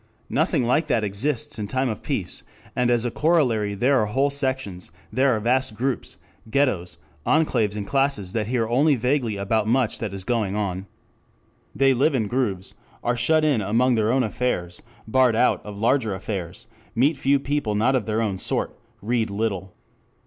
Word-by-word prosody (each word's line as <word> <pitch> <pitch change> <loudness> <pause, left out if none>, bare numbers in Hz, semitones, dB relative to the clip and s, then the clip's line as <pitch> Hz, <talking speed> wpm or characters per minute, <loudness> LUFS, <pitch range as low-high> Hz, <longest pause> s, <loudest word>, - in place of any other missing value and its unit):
Nothing - - +1
like 130 +7 +1
that 115 -3 +1
exists 130 +7 -2
in 105 - -3
time 130 +5 0
of 110 -3 -4
peace, - - -3 0.3
and 125 -1 +2
as 120 -1 +2
a 120 - -1
corollary 125 -12 +1
there 130 +6 +3
are 105 - 0
whole 135 +6 +1
sections, 130 - -3 0.2
there 130 -1 +3
are - - -1
vast 125 +1 +1
groups, 130 +2 -3 0.3
ghettoes, 110 -10 0 0.3
enclaves 115 -10 +2
and 105 -1 -4
classes 135 -8 0
that 110 -2 -1
hear 115 -2 0
only 140 +6 +3
vaguely 125 -3 0
about 105 +2 0
much 120 -1 +1
that 110 -4 -3
is 95 -1 -6
going 110 -3 -1
on. 95 -2 -3 0.9
They 135 0 +4
live 140 +4 +2
in 115 -4 +1
grooves, 105 -5 -2 0.3
are 120 0 +1
shut 155 +6 +2
in 140 -8 +2
among 120 +6 +2
their 110 -1 +2
own 130 0 +2
affairs, 100 -7 -2 0.3
barred 125 0 +3
out - - +2
of 105 -1 -8
larger 115 -1 +1
affairs, 95 -3 -5 0.3
meet 140 +7 +3
few 140 +1 +2
people 140 -6 -1
not 120 +6 +2
of 120 -4 -1
their 110 +1 0
own 100 -4 -2
sort, - - -1 0.3
read 115 0 0
little. 100 -3 -3
115 Hz, 180 wpm, -23 LUFS, 105-130 Hz, 0.9 s, They